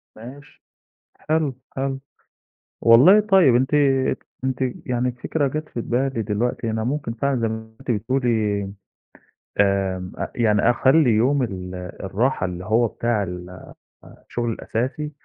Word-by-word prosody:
ماشي. 135 +6 -13 0.7
حلو، 155 -4 +1 0.2
حلو. 135 0 -2 0.8
والله، 130 - +7
طيب 190 - +4
أنتِ 130 +2 +1 0.5
ك - - -34 0.2
أنتِ 130 -1 -1 0.3
يعني 125 0 0
الفكرة 135 +4 -1
جات 155 +2 -4
في 120 - -5
بالي 125 0 -1
دلوقتي، 115 +3 -2
أنا 110 0 -2
ممكن 135 -2 -2
فعلًا 135 +1 0
زي 115 - +1
ما 110 0 -7
أنتِ 135 - -6
بتقولي 110 -3 0 1.0
آمم، 95 -2 +1
أ - - -4
يعني 105 -3 +2
أخلّي 130 +3 +4
يوم 130 +6 +2
ال 95 -5 -5 0.3
الراحة 105 +3 0
اللي 90 0 -5
هو 115 +3 +3
بتاع 115 -2 -1
ال 90 -1 -7 0.5
أ - - -17
شُغلي 120 -1 -2
الأساسي 130 +8 -3
120 Hz, 140 wpm, -22 LUFS, 110-135 Hz, 1.0 s, والله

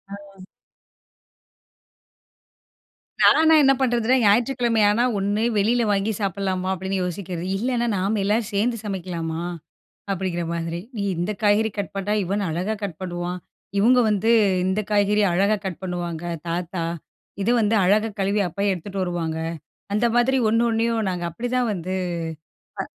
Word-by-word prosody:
ஆ. 195 -2 -14 2.8
நான்லா 320 0 +6
என்ன 270 -1 +5
பண்றதுன்னா, 240 -1 +2
ஞாயிற்றுக்கிழமையானா 230 0 +3
ஒண்ணு 205 +2 0
வெளியில 230 +4 +2
வாங்கி 200 +2 +1
சாப்பிடலாமா 190 -2 -2
அப்படின்னு 190 +1 -3
யோசிக்கிறது. 180 -1 -4
இல்லைனா 240 +2 0
நாம 200 +3 0
எல்லாரும் 210 +2 0
சேர்ந்து 230 +4 +1
சமைக்கலாமா? 170 -5 -4 0.7
அப்படிங்கிற 185 -2 -2
மாதிரி. 170 0 -3 0.2
"நீ, 205 - -2 0.2
இந்த 175 +5 -1
காய்கறி 210 +1 +3
கட் 200 - -3
பண்ணா 195 +1 -1
யுவன் 200 +3 -1
அழகா 180 +7 -1
கட் 185 -6 -4
பண்ணுவான். 175 0 -4 0.4
இவுங்க 250 +5 +5
வந்து 210 +1 +1 0.4
இந்த 190 +3 +1
காய்கறி 205 0 +3
அழகா 200 +4 +2
கட் 180 -2 -5
பண்ணுவாங்க, 175 -2 -4 0.2
தாத்தா. 175 0 -3 0.6
இது 215 - +1
வந்து 215 0 +2
அழகா 210 +4 +3
கழுவி 200 +2 +1
அப்பாயி 200 +4 -1
எடுத்துட்டு 190 +2 -5
வருவாங்க." 170 -3 -2 0.6
அந்த 235 +3 +3
மாதிரி 260 +2 +3
ஒண்ணு 230 +2 +2
ஒண்ணையும் 225 -1 0
நாங்க 180 -1 -3
அப்படிதான் 245 +6 -1
வந்து 185 0 -4 0.9
அ - - -5
200 Hz, 130 wpm, -23 LUFS, 180-220 Hz, 2.8 s, நான்லா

